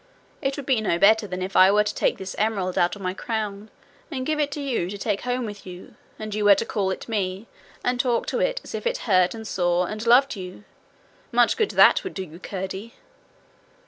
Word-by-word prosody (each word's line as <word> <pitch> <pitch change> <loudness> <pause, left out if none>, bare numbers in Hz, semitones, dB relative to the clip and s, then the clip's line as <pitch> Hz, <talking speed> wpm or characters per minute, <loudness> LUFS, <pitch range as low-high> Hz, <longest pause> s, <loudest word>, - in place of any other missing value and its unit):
It 270 -1 -1
would 285 - -6
be 255 -5 +2
no 180 -5 +1
better 215 +3 +4
than 185 -1 -4
if 190 +1 -6
I 185 +1 +7
were 210 +1 +4
to 210 - -3
take - - 0
this 190 0 -7
emerald 200 -4 0
out 175 +3 +2
of 200 - -10
my 185 0 -1
crown 215 -1 -4 0.4
and 260 -5 -4
give 310 +1 -1
it 290 -1 +1
to - - -5
you 255 -11 -2
to 205 - -6
take 205 -1 -2
home 250 0 -2
with 205 -2 -8
you, 180 -1 -11 0.2
and 215 -1 -6
you 210 0 -1
were 205 -1 +8
to 230 - -2
call 200 -4 -1
it 190 - -5
me, 200 -2 -2 0.4
and 245 0 0
talk 245 -2 +1
to - - -1
it - - 0
as - - -10
if - - -3
it 485 - 0
heard 185 -2 +3
and 220 -1 -8
saw 175 -1 +1
and 215 +4 -5
loved 255 +3 +5
you. 185 0 -9 0.7
Much - - +3
good 435 -3 +1
that - - +5
would 380 - -6
do 190 - -3
you, 165 -1 -12
Curdie! 190 +5 -6
210 Hz, 235 wpm, -24 LUFS, 190-245 Hz, 0.7 s, were